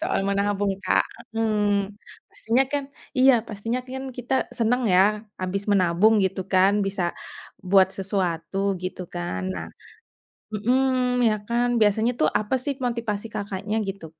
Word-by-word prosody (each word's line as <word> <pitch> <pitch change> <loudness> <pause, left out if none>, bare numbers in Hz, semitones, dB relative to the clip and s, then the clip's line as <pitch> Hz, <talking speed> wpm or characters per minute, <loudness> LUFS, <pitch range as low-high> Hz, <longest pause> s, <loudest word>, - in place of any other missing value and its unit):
soal 335 - 0
menabung, 200 0 +1
Kak, - - +3 0.3
mhm. 205 -2 0 0.3
Pastinya 245 +4 +1
kan 285 -1 0 0.3
iya, 265 +1 +7 0.2
pastinya 225 +4 -3
kan 265 +1 -5
kita 250 +2 -3 0.2
senang 245 +2 +2
ya 180 - +6 0.4
habis 190 +2 -2
menabung 190 +3 +4
gitu 190 0 -1
kan, 190 +1 +5
bisa 195 -1 -2 0.7
buat 190 0 +6
sesuatu 185 -3 -2 0.3
gitu 185 0 -5
kan. 90 +2 -3
Nah 80 -2 -5 0.9
mhm 220 +5 +1 0.5
iya 215 -2 +3
kan. 240 +1 +1
Biasanya 220 +3 +3
tuh 155 - +4
apa 215 +5 -1
sih 285 - -1
motivasi 230 -3 -2
Kakaknya 200 +1 -3
gitu 195 -3 -5
205 Hz, 135 wpm, -24 LUFS, 190-230 Hz, 0.9 s, iya